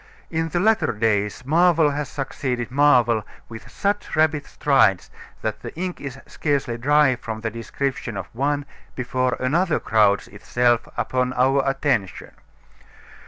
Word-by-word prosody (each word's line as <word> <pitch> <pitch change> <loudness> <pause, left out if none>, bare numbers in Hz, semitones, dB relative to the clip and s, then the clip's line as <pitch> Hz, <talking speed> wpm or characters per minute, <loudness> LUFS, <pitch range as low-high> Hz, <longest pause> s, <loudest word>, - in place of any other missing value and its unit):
In 165 0 -1
the 175 - -1
latter 215 - +2
days 105 +1 0
marvel 165 0 +4
has 145 -1 -3
succeeded 130 -3 -3
marvel 125 -6 +4 0.3
with 115 -1 -10
such 205 +1 -2
rapid 155 -2 +1
strides 110 -10 +2 0.3
that - - -3
the - - -8
ink 180 +2 -4
is 135 -2 -6
scarcely 140 -5 -1
dry 140 +2 +3
from 110 -2 -6
the 115 0 -3
description 115 +1 -4
of - - -4
one 140 +3 -1 0.3
before 125 0 -1
another 160 +6 +1
crowds 105 -2 +2
itself 120 +2 0
upon 125 -1 0
our 135 +2 +3
attention. 135 -8 -1
130 Hz, 135 wpm, -22 LUFS, 115-150 Hz, 0.3 s, marvel